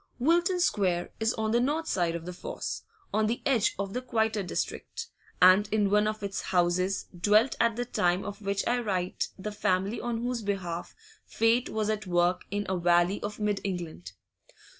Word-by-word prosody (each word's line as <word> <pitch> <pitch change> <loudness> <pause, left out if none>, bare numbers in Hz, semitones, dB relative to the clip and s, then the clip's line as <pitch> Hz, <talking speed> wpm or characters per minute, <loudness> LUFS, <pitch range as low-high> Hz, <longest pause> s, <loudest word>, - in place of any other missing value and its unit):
Wilton 345 +7 +2
Square 185 - +1
is 225 +1 +1
on 220 0 -1
the 235 - +3
north 295 +6 0
side 170 -2 0
of 165 -1 -6
the 180 - -5
foss, - - -5 0.3
on 215 +1 +2
the 235 +2 -1
edge 245 -7 +2
of 195 0 -3
the 250 - -2
quieter 220 -3 0
district, 460 - -4 0.3
and 185 +3 +6
in 205 -2 +2
one 210 +1 +4
of 215 -1 -3
its 200 -1 -3
houses 180 +1 +1
dwelt 210 +7 +4
at 235 -1 +3
the 245 +1 -2
time 180 -4 +1
of 205 +1 -6
which 200 -1 -1
I 245 +1 +1
write 185 -6 -1
the 210 +2 -5
family 195 +1 0
on 235 -1 -2
whose 245 -1 -1
behalf 185 -5 -3 0.3
Fate 230 +2 +2
was 215 -1 -1
at 210 -2 -4
work 175 0 +1
in 205 +1 -2
a 190 - 0
valley 175 +2 +3
of 205 +1 -5
mid 210 -1 0
England. 170 - -5
205 Hz, 185 wpm, -28 LUFS, 185-225 Hz, 0.3 s, and